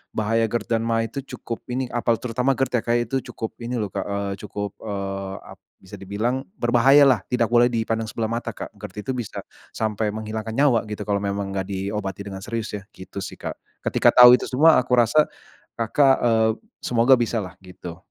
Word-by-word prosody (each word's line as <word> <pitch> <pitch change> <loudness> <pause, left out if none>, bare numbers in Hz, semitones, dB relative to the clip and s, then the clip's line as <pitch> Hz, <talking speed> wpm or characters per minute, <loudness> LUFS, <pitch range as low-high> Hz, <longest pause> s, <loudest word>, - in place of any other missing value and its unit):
bahaya 115 +1 +1
GERD 115 0 -2
dan - - -3
maag 115 -1 0
itu - - -4 0.2
cukup 115 - -6
ini 125 0 -3
apa 120 -1 +1
terutama 125 +3 0
GERD 135 -1 -1
ya - - -5
Kak 120 - +3
itu 120 - -4
cukup 110 - -5
ini 120 +2 -3
loh 105 -4 -3
Kak, 100 - -3
eee, 100 0 -2
cukup, 105 -1 -5
eee, 100 -2 -4
ap - - -13 0.2
bisa 95 +1 -13
dibilang 110 +7 -1 0.2
berbahayalah 125 -1 +5
tidak 125 -1 +2
boleh 120 0 +5
dipandang 115 -1 -1
sebelah 110 0 -3
mata 115 +1 -2
Kak - - -7
GERD 105 - -9
itu 130 - -1
bisa, 120 -5 -5 0.3
sampai 110 -1 -1
menghilangkan 110 +1 -5
nyawa 135 -5 +4
gitu 105 0 -4
kalau 100 -1 0
memang 100 -1 -3
enggak 95 -1 -3
diobati 100 0 -4
dengan 95 -1 -6
serius 115 0 -4
ya 105 - -4
gitu 95 +1 -9
sih - - -6
Kak - - -5 0.3
ketika - - +4
tahu 125 0 +10
itu - - +2
semua 155 +3 +5
aku 125 0 +1
rasa, 150 +6 +4 0.5
Kakak, 135 +4 +3
eee, 110 -2 +3 0.3
semoga 120 +2 +5
bisalah 115 -5 -2
gitu. 90 -2 -9
115 Hz, 190 wpm, -23 LUFS, 100-120 Hz, 0.5 s, tahu